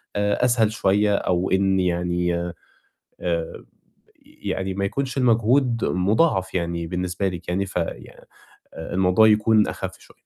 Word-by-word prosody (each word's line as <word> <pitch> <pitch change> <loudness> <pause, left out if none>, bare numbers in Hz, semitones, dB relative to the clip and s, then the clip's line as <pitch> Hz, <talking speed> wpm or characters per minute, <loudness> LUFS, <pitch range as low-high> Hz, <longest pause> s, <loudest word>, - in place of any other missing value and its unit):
أ 105 +4 +1
أسهل 115 -3 +2
شوية، 105 -1 +2
أو 90 -1 -1
إن 95 0 +2
يعني 90 -1 0 0.9
آآ 85 -2 -3 0.6
يعني 95 0 -4
ما 100 0 -2
يكونش 135 +5 -3
المجهود 120 0 +2
مُضاعف 95 - +1
يعني 85 -1 -2
بالنسبة 90 +2 -2
لِك 90 -1 -7
يعني، 95 +2 -1
في 90 -2 -2 0.9
آآ 80 - -7
الموضوع 95 +4 +4
يكون 110 0 +4
أخَف - - -6
شوية. - - -20
95 Hz, 130 wpm, -23 LUFS, 90-110 Hz, 0.9 s, الموضوع